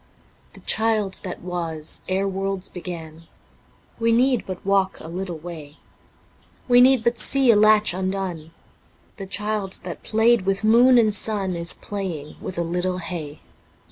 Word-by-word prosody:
The - - -13
Child 215 -3 +1
that 180 - -7
was 165 -4 -4
ere 190 +1 0
worlds 195 0 -3
begun 165 -3 -8 0.3
(... - - -34
We 230 0 +2
need 250 +2 +2
but 185 -1 -7
walk 195 -1 +1
a - - -10
little 175 0 -5
way... 155 -3 -10 0.9
We 245 -1 +6
need 255 -2 +5
but 235 -1 0
see 265 +2 +4
a - - +4
latch 215 -1 +5
undone.. 185 -4 -4 0.4
.), - - -35
The 195 - -7
Child 210 -1 -3
that 175 -2 -7
played 225 +1 +2
with 195 +1 0
moon 240 +4 +6
and 220 -3 +3
sun 200 -3 +1
Is 170 0 +1
playing 180 -8 -6
with 185 - -6
a 170 - 0
little 180 +2 -2
hay. 165 -4 -7
195 Hz, 160 wpm, -22 LUFS, 175-215 Hz, 0.9 s, We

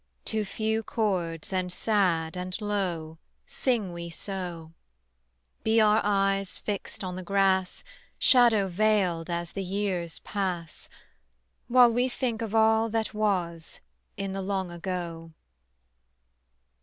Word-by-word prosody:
To 220 -1 -1
few 220 +2 -1
chords 185 -7 -2
and 185 -1 -1
sad 180 -6 +1
and 180 0 -4
low 180 -7 -2 0.3
Sing 225 -9 -1
we 170 0 -6
so: 175 -3 -5 0.9
Be 220 +1 +3
our 215 0 +5
eyes 195 -1 +2
fixed 205 -1 -4
on 180 -1 -4
the 185 - -5
grass 190 0 +1 0.3
Shadow 235 -6 +5
veiled 185 -3 +1
as 170 0 -2
the 195 - -4
years 185 -3 -2
pass, 180 -5 -4 0.8
While 245 -1 +6
we 245 +2 +2
think 240 -3 -2
of 225 -1 -3
all 220 0 +4
that 225 0 -1
was 180 -6 -1 0.4
In 195 -1 -3
the 195 - -3
long 190 -2 -2
ago. 170 -2 -5
195 Hz, 120 wpm, -27 LUFS, 175-215 Hz, 0.9 s, While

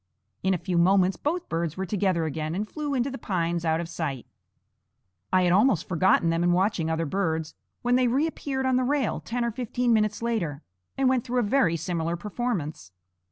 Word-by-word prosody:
In 190 0 +2
a - - -1
few 175 0 -1
moments 185 +1 +4
both 340 +4 -2
birds 165 -1 -2
were 190 - -2
together 185 -3 0
again 155 +1 -3
and 210 +3 -2
flew 295 +2 -3
into 260 +2 0
the 270 - -6
pines 170 -3 -1
out 160 -1 +1
of 170 - -3
sight. 155 -7 -4 1.1
I 185 0 +4
had 175 - +3
almost 200 - +3
forgotten 170 -1 +3
them 165 +1 0
in 175 0 +3
watching 180 -3 +1
other 160 0 0
birds, 160 -2 -1 0.3
when 245 +1 +3
they 255 -1 +3
reappeared 270 0 -1
on 260 -1 +3
the 255 - +2
rail, 275 -3 0
ten 240 +1 -2
or 235 - -1
fifteen 245 0 0
minutes 215 0 +1
later, 170 -11 -2 0.3
and 270 -1 +2
went 255 -2 +2
through 250 +1 -2
a - - 0
very 205 -7 +2
similar 165 0 -2
performance. 175 - -4
190 Hz, 200 wpm, -26 LUFS, 165-245 Hz, 1.1 s, moments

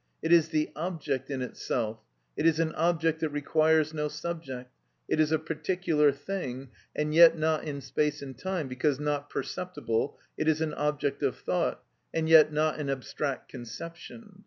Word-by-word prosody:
It 165 +1 +3
is 165 -2 +5
the 155 -1 0
object 150 -6 -3
in 135 -2 -2
itself; 115 -3 -3 0.4
it 165 - +2
is 160 -1 +3
an 160 -1 +1
object 165 -1 +1
that 160 - 0
requires 155 +1 +2
no 150 -1 -1
subject; 150 -5 -6 0.4
it - - 0
is 155 0 +3
a 160 - +4
particular 160 -1 +1
thing, 140 -4 -5 0.3
and 150 0 -1
yet 165 0 +8
not 155 0 +1
in 140 -2 -4
space 150 +2 -1
and 135 -2 -8
time, 175 +2 -3
because 130 +2 0
not 145 -1 -1
perceptible; 145 -8 -2 0.2
it 155 - 0
is 155 -1 +3
an 160 -1 -1
object 150 -1 -1
of - - 0
thought, - - -1 0.3
and 160 -1 +1
yet 160 -1 +8
not 155 +1 +1
an 145 -2 -2
abstract 135 +1 -3
conception. 170 - -9
155 Hz, 170 wpm, -29 LUFS, 140-160 Hz, 0.4 s, yet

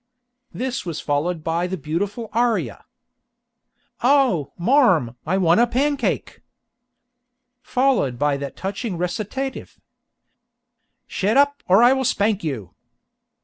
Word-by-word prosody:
This 255 -6 -4
is 165 - -4
followed 155 +3 -2
by 165 +2 -1
the 190 +1 -4
beautiful 200 - -4
aria: 235 0 0 1.2
"O! 245 - +2
marm, 180 - +3
I 185 +4 +1
want 175 0 +3
a 240 - +4
pancake!" 280 +4 -1 1.2
Followed 255 - +1
by 145 +2 +1
that 140 0 -6
touching 195 0 -4
recitative: 215 +10 -4 1.3
"Shet 205 +6 0
up, 285 0 +3
or 195 +5 +5
I 245 +2 +6
will 265 0 -1
spank 210 -4 0
you!" 125 - -5
195 Hz, 110 wpm, -22 LUFS, 165-250 Hz, 1.3 s, I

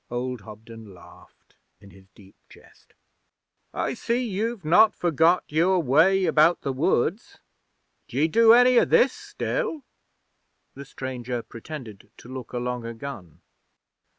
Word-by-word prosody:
Old 125 -1 -4
Hobden 110 -1 -13
laughed 85 - -20 0.2
in 100 -1 -17
his 95 0 -19
deep 95 -1 -18 0.2
chest. - - -21 0.8
'I - - -3
see 240 +1 -2
you've 215 -1 -4
not 180 +7 +5
forgot 170 +1 +2
your 170 +5 +1
way 170 +7 +3
about 160 +1 +3
the 135 - -3
woods. 165 - -1 0.7
D'ye 140 +6 0
do 225 +7 +5
any 245 +1 +6
o' - - +2
this 260 +1 +3
still?' 445 - -4 0.9
The 140 - -10
stranger 125 -3 -6
pretended 115 -4 -10
to - - -15
look 130 -3 -8
along 125 0 -4
a 115 0 -7
gun. 95 - -10
140 Hz, 130 wpm, -24 LUFS, 115-190 Hz, 0.9 s, any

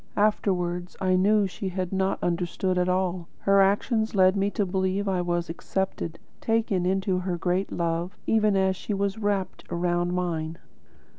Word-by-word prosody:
Afterwards 180 -4 0
I 185 -1 +2
knew 205 +3 +4
she 190 +1 -4
had 185 0 -3
not 190 0 +1
understood 180 +1 0
at 180 0 +1
all. 180 -2 0
Her 195 0 +4
actions 220 +3 +1
led 185 0 +5
me 200 0 +1
to 205 0 -1
believe 190 +2 -1
I 185 -2 +1
was 175 -1 -1
accepted, 170 -1 -3 0.2
taken 220 -5 +1
into 190 0 +1
her 180 -1 -2
great 180 +3 -1
love, 170 +2 -2
even 215 -2 +3
as 190 0 +2
she 200 +3 -4
was 200 +2 -1
wrapped 200 -3 -1
around 175 0 0
by 175 - -2
mine. 165 -2 -2
185 Hz, 165 wpm, -26 LUFS, 175-195 Hz, 0.2 s, led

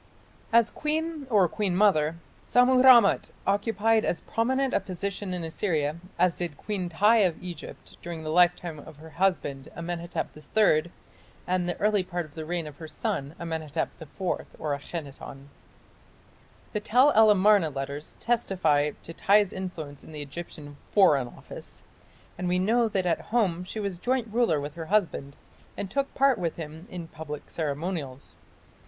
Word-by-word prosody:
As 230 0 +5
queen 310 -1 -2
or 200 -6 +4
queen 190 +1 -1
mother, 165 -6 +3 0.3
Sammu 255 +1 +5
rammat 240 -6 +7 0.2
occupied 220 +2 +2
as 175 - -1
prominent 260 +3 0
a - - +3
position 195 +1 -4
in 180 -2 -3
Assyria 160 -3 -1 0.2
as 180 0 +3
did 170 -5 -4
Queen 195 -4 -3
Tiy 210 +6 +4
of 175 -4 +1
Egypt 175 -4 -9
during 170 -2 -6
the 155 - -3
lifetime 175 -2 +2
of 160 +1 -12
her 160 +2 -13
husband, 155 -6 -1
Amenhotep 170 0 -4 0.3
III, 170 -6 +4 0.5
and 180 -1 0
the 175 - -2
early 210 -1 +2
part 175 -2 -4
of 150 - -17
the 160 -1 -6
reign 170 0 -2
of 150 -2 -9
her 160 - -8
son, 145 -1 -3
Amenhotep 160 -2 -3
IV 160 - -9 0.5
(Akhenaton). 140 -2 -6 1.2
The 210 - 0
Tell 250 +7 +4
el 220 -3 +6
Amarna 205 -4 +5
letters 140 +1 -6
testify 170 -11 +1
to 165 - -7
Tiy's 200 +2 +3
influence 160 -7 -6
in - - -13
the 150 -1 -4
Egyptian 145 -1 -9
"Foreign 145 -11 +5
Office", - - -10 0.6
and 180 - -2
we 180 +1 +2
know 225 +5 +3
that 195 -4 -1
at 175 - +1
home 195 -7 0
she 200 +4 -6
was 200 -4 -3
joint 250 +2 0
ruler 230 -11 +2
with 145 +1 -5
her 165 0 -7
husband 165 -9 0 0.4
and 195 -2 -4
took 275 +4 -1
part 270 -3 +3
with 170 -3 -2
him 160 +2 -8
in 175 -2 -7
public 150 -2 -8
ceremonials. 150 -3 -4
175 Hz, 160 wpm, -27 LUFS, 155-210 Hz, 1.2 s, rammat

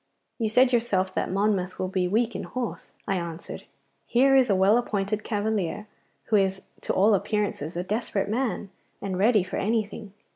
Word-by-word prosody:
'You 225 -2 0
said 250 +3 +4
yourself 190 -6 +1
that - - -1
Monmouth 195 -2 0
will 185 - -2
be 185 -1 0
weak 225 +4 +1
in - - -3
horse,' 250 -2 -5
I 195 -2 +1
answered. 170 -1 -6 0.4
'Here 270 +3 +4
is 260 -3 +5
a 200 - +4
well 195 +5 +4
appointed 210 -2 -2
cavalier, 210 -3 -2 0.4
who 215 - +2
is 190 -1 0 0.2
to - - -2
all 205 +3 +4
appearance 205 -1 0
a 170 +4 -4
desperate 205 0 -2
man 220 -3 -2 0.3
and 190 -2 -3
ready 210 -1 +4
for 185 - -5
anything. 210 -1 -2
205 Hz, 175 wpm, -26 LUFS, 190-225 Hz, 0.4 s, is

